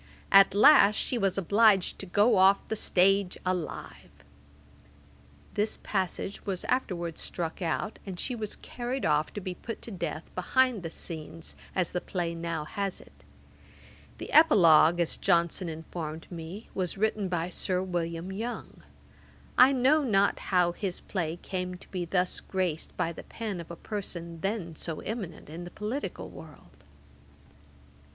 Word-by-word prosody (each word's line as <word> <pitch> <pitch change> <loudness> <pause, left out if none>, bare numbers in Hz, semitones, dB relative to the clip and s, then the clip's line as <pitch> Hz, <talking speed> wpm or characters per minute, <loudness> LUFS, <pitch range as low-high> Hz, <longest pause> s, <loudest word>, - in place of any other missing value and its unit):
At 195 0 +7
last 210 -3 +7
she 245 - -1
was 195 -2 +1
obliged 200 0 +4
to 195 - -6
go 205 +5 +4
off 195 +1 +4
the 220 - 0
stage 195 -1 +2
alive.' 170 - -5 1.3
This 210 +1 0
passage 190 0 -2
was 190 -3 -3
afterwards 175 -10 -1
struck 170 +1 -3
out, 175 +5 -2
and 185 -3 -7
she 255 - -2
was 215 -3 -5
carried 250 +2 -4
off 150 0 +2
to - - -4
be 185 -2 -4
put 225 +5 -7
to 230 - -7
death 170 -3 -4
behind 250 +4 +2
the 165 - -5
scenes, 160 0 -6 0.2
as 180 -3 +1
the 180 - -2
play 175 -3 -2
now 165 -2 -3
has 195 +3 -3
it. - - -17 1.0
The - - -7
Epilogue, 175 - +7
as 170 - +1
Johnson 170 +1 +1
informed 160 0 -6
me, 175 +5 -7
was 185 0 -2
written 215 -1 0
by 175 -1 -1
Sir 185 0 -1
William 170 -1 -3
Yonge. 225 +5 -6 0.7
I 255 +2 +8
know 275 +4 +4
not 200 -6 +2
how 180 -2 +4
his 180 0 -3
play 170 -4 -3
came 180 -1 -3
to 180 - -14
be 180 -2 -3
thus 180 +1 0
graced 180 -4 -3
by 165 - 0
the 170 - -8
pen 210 -6 -5
of 165 - -12
a 170 - -6
person 170 -5 -6
then 195 -5 -2
so 160 0 -4
eminent 210 -6 -6
in 165 +4 -7
the 175 - -7
political 210 - -4
world. 90 -4 -14
185 Hz, 155 wpm, -29 LUFS, 170-205 Hz, 1.3 s, I